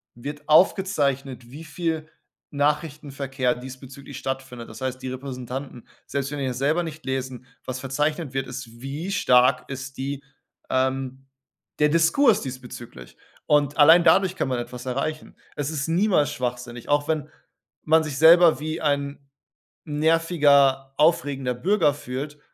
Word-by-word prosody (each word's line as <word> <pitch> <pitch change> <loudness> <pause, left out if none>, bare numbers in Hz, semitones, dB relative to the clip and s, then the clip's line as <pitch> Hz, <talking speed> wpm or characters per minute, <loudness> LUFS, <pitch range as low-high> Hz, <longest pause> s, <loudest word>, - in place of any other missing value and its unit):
wird 145 +5 -8
aufgezeichnet, 140 - +2
wie 155 +4 -9
viel 160 0 -3 0.4
Nachrichtenverkehr 140 -3 -1
diesbezüglich 130 +2 -10
stattfindet. 130 -3 -5
Das - - -11
heißt, 130 0 -3
die 130 - -4
Repräsentanten, 130 -1 -7 0.2
selbst 140 0 -3
wenn 145 - -4
die 135 - -1
das 125 -1 -3
selber 150 +6 +1
nicht 160 -1 -8
lesen 130 -2 -4 0.2
was 130 0 -4
verzeichnet 150 +2 -2
wird, 135 0 -2
ist: 120 -2 -9
Wie 150 +8 -5
stark 125 -6 +3
ist 135 0 -7
die 140 +1 -4 0.5
ähm, 130 0 -1 0.5
der 150 - +4
Diskurs 165 - +4
diesbezüglich? 125 - -9 0.3
Und 145 -1 +2
allein 160 +3 +7
dadurch 190 +1 +4
kann - - -1
man 125 -1 -1
etwas 125 +1 -7
erreichen. 155 +5 -4 0.2
Es 145 -1 -2
ist 150 0 -3
niemals 175 -2 +2
schwachsinnig, 120 -1 -5
auch 145 0 +2
wenn 155 -1 -1 0.5
man 160 +1 +4
sich 150 -4 -5
selber 165 0 +7
wie 155 +2 -4
ein 140 -1 -1 0.7
nerviger, 145 -4 +3
aufregender 145 -5 +2
Bürger 165 - +2
fühlt. 145 +2 -6
140 Hz, 140 wpm, -24 LUFS, 130-155 Hz, 0.7 s, allein